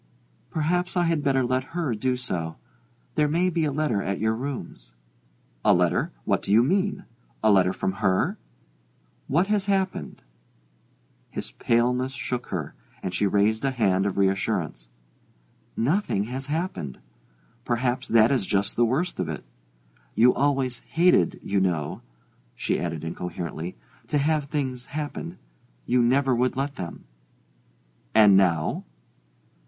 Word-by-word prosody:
"Perhaps 175 +4 0
I 175 - +4
had 165 -3 +1
better 135 -2 +2
let 130 +5 -1
her 155 -8 0
do 125 +4 0
so. 85 -10 -3 0.6
There 150 -1 +2
may 175 +5 +2
be 165 -1 +1
a 145 - 0
letter 140 -8 0
at 100 0 -2
your 110 +1 +1
rooms." 115 - -6 0.7
"A - - +5
letter? - - +1
What - - +1
do - - -3
you 110 +3 +6
mean? 195 +8 0 0.4
A 110 - +5
letter 95 -2 +4
from 95 - -1
her? 95 -3 +1 0.9
What 165 +7 +3
has 205 -1 0
happened?" 195 -1 -1 1.1
His - - -6
paleness 125 +3 +1
shook 125 0 -4
her, 75 -6 -4 0.3
and 90 - -3
she 100 +3 +2
raised 105 +4 +2
a 135 - +2
hand 100 -7 +2
of 100 - -3
reassurance. 95 -10 0 0.9
"Nothing 140 - +1
has 130 +5 -5
happened 150 - -3 0.7
perhaps 125 +2 0
that 115 +1 +5
is 125 -8 +1
just 100 +1 +1
the 120 - +4
worst 155 +10 -1
of 80 - -1
it. 80 - -5 0.7
You 120 +3 +6
always 135 -3 +1
hated, 165 - +3
you 100 0 +1
know," 85 -6 -1 0.5
she - - -1
added 80 -3 -3
incoherently, 85 -2 -5 0.3
"to 150 - +1
have 150 +1 +1
things 130 -4 -3
happen: 145 - -5 0.5
you 125 0 +3
never 130 +2 +3
would 125 +2 +1
let 140 +1 -1
them." 85 - -7 1.1
"And 105 -3 +7
now 85 -5 +2
125 Hz, 140 wpm, -25 LUFS, 95-145 Hz, 1.1 s, And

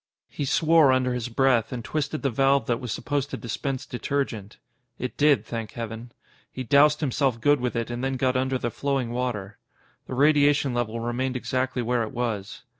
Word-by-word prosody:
He 145 - -3
swore 155 0 +4
under 130 -1 +1
his 125 -1 -3
breath 120 -2 +2
and 120 -3 -5
twisted 155 0 -2
the 135 - +1
valve 135 +1 +3
that 120 0 0
was 125 -3 -5
supposed 145 +4 -2
to - - -5
dispense 130 +3 -4
detergent. 125 -5 -3 0.4
It 125 - -4
did, 145 -1 +3
thank 115 -2 -5
Heaven. 115 +1 -6 0.4
He 130 - -5
doused 145 +5 +4
himself 135 -4 0
good 145 +4 +3
with 125 0 -2
it 115 0 -2
and 120 +1 -4
then 135 0 -1
got 130 0 +1
under 130 +1 +1
the 120 -1 -3
flowing 135 -3 -1
water. 115 -5 -3 0.5
The 130 - -5
radiation 145 -1 +4
level 115 -1 -2
remained 125 +3 -2
exactly 130 0 -1
where 120 +1 +1
it 110 +1 -4
was. 110 -5 -3
125 Hz, 190 wpm, -25 LUFS, 120-140 Hz, 0.5 s, swore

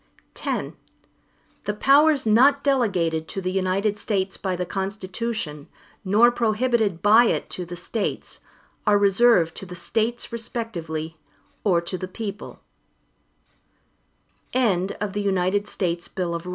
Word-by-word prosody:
X - - -2 0.9
The 210 - -2
powers 280 +4 +4
not 265 +6 +5
delegated 185 - +1
to - - -5
the 185 -1 -2
United 195 +2 0
States 195 -3 -1
by 190 -2 -2
the 180 0 -3
Constitution, 190 -4 -4 0.4
nor 215 +5 +5
prohibited 225 -5 0
by 220 +4 +7
it - - -1
to 180 - -4
the 175 - -6
States, 195 +4 -4 0.5
are 205 -1 +5
reserved 200 -4 +4
to - - -5
the 180 - -8
States 225 +8 -2
respectively, 170 -9 -4 0.5
or 180 -5 +3
to 175 +2 -5
the 185 - -4
people. 205 +1 -7
205 Hz, 105 wpm, -24 LUFS, 180-230 Hz, 0.9 s, by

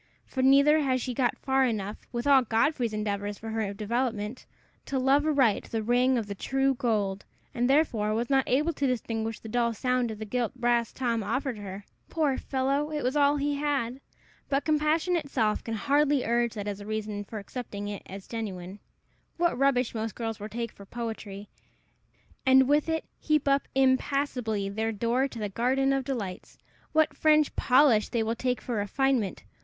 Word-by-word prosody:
For 260 - -3
neither 280 +3 +6
had 260 -3 +1
she 250 0 -3
got 245 0 0
far 265 0 +1
enough, 215 -4 -2
with 240 0 -3
all 280 -2 +6
Godfrey's 235 +1 +1
endeavors 205 -1 -3
for 225 0 -7
her 220 -3 -1
development, 220 +2 -3 0.4
to 275 - -1
love 275 +3 +3
aright 265 -9 +2
the 225 -1 -3
ring 250 +3 +3
of 225 - -1
the 205 - -5
true 270 +6 0
gold, 210 -6 -1 0.3
and 245 +1 0
therefore 230 -8 +2
was 235 +2 -1
not 270 -1 +2
able 300 +6 +2
to 280 -1 0
distinguish 225 -3 -2
the - - -10
dull 235 0 0
sound 250 +1 0
of 220 - -6
the 215 - -6
gilt 245 +2 -2
brass 240 -2 +1
Tom 235 -3 -1
offered 235 +3 -2
her. 200 0 -8 0.2
Poor 300 -5 0
fellow! 275 +3 -1
it 300 -1 -2
was 255 +3 0
all 290 0 +4
he 285 0 -1
had. 275 -3 -1 0.5
But 275 0 0
compassion 310 +3 +2
itself 265 -9 0
can 225 - -3
hardly 285 +4 +2
urge 235 0 +1
that 205 -1 -5
as 205 0 -4
a - - -8
reason 215 -1 -3
for 215 +2 -8
accepting 205 -1 -6
it 205 -2 -5 0.2
for - - -21
genuine. 195 -4 -6 0.6
What 345 0 +2
rubbish 255 -2 +2
most 225 -1 -3
girls 225 -2 -4
will 210 +1 -6
take 230 0 -4
for 200 - -14
poetry, 210 -2 -6 1.0
and 265 -1 +6
with 295 +3 +2
it 320 -1 -1
heap 305 -2 +1
up 275 0 +2
impassably 260 -5 +1
their 220 +3 -2
door 235 +5 0
to 245 - -10
the 210 -2 -2
garden 260 +6 +1
of 270 -1 0
delights! 215 -9 -5 0.3
what 315 0 +2
French 305 -1 +3
polish 250 -5 +4
they 235 -2 0
will 225 +1 -1
take 250 +1 -2
for 240 -4 -3
refinement! 225 0 0
245 Hz, 185 wpm, -28 LUFS, 215-275 Hz, 1.0 s, neither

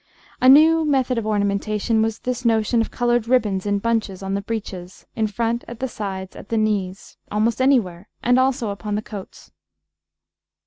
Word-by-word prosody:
A 255 - +6
new 320 +4 +7
method 265 -5 +1
of 215 - -5
ornamentation 210 +2 0
was 220 0 0
this 250 0 -4
notion 225 0 +2
of 225 - -2
coloured 240 -1 0
ribbons 210 -6 +1
in 205 0 +1
bunches, 210 -3 -2
on 195 0 -3
the 200 - -1
breeches, 195 -4 -6
in 220 -1 +1
front, 230 +3 -2
at 235 -1 -9
the 265 - -1
sides, 190 -5 -6
at - - -11
the 230 - 0
knees 200 -3 -2
almost 220 +3 +1
anywhere 210 -9 +1
and 245 +1 +4
also 260 -4 +1
upon 200 +1 -4
the 210 - -2
coats. 205 -4 -10
220 Hz, 175 wpm, -22 LUFS, 200-240 Hz, -, new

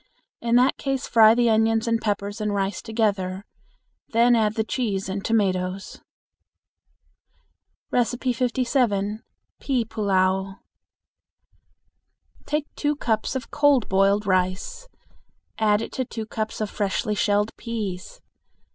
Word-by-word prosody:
In 235 0 +1
that 250 +2 +4
case 270 -2 -2
fry 220 -1 +6
the 240 0 +3
onions 225 +1 +2
and 230 0 +1
peppers 205 0 -2
and 210 -1 -1
rice 195 -1 -1
together. 200 -4 -1 0.6
Then 235 +1 +4
add 215 -2 +1
the 220 - +1
cheese 210 -5 -2
and 195 +1 -4
tomatoes. 190 -3 -1 1.9
57. 245 -3 0 0.4
Pea 255 -4 0
Pullao. 190 -3 0 1.9
Take 300 0 -1
two 295 0 -1
cups 225 -3 -1
of 260 - -5
cold 285 -5 +3
boiled 195 +2 +3
rice, 185 - -1 0.7
add 215 0 +2
to - - -3
it 255 - -4
two 220 -2 -5
cups 215 0 -4
of 210 - -2
freshly 205 +1 -1
shelled 205 +1 +1
peas. 210 -6 -5
220 Hz, 115 wpm, -24 LUFS, 200-235 Hz, 1.9 s, fry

